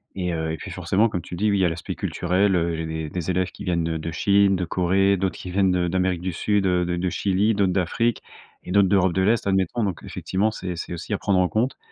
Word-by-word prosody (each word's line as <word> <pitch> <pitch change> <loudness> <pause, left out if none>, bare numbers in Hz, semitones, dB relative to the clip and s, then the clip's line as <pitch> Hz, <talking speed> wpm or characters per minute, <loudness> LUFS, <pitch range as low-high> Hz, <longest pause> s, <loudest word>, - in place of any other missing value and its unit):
Et 90 -2 -2
heu, 80 -1 -2
et 80 - -4
puis 100 - -8
forcément, 95 +4 +1
comme 90 -4 -3
tu 90 - -8
dis, 105 +5 +1
oui, 100 - +2
il - - +2
y - - +4
a - - +3
l'aspect 85 0 -5
culturel, 95 +2 +1
heu. 85 -1 +1
Il 80 - -4
y - - -3
a - - -4
des 80 -1 -4
des 90 +1 -4
élèves 90 +1 0
qui - - -10
viennent 85 -2 0
de 80 0 -2
de 80 +1 -5
Chine, 100 +2 +3
de 90 - -2
Corée, 95 +3 +2
d'autres 95 -2 -2
qui 90 - -8
viennent 95 0 +2
de 90 -1 +1
d'Amérique 90 0 0
du 90 0 -3
Sud, 105 +3 0
heu, 90 -1 +2
de 90 0 -1
de 90 +1 -1
Chili, 100 +4 +1
d'autres 100 -2 +2
d'Afrique 105 +6 0 0.4
et - - -7
d'autres 100 0 +4
d'Europe 95 -2 +3
de 95 - +1
l'Est, 110 +4 +2
admettons. 95 +4 +1
Donc, 95 -5 -2
effectivement, 100 +4 -1
c'est 90 -4 -5
c'est 85 - -6
aussi 85 +5 -5
à - - +1
prendre 100 -3 +2
en 90 - +3
compte, 115 +8 -1
95 Hz, 280 wpm, -23 LUFS, 85-100 Hz, 0.4 s, y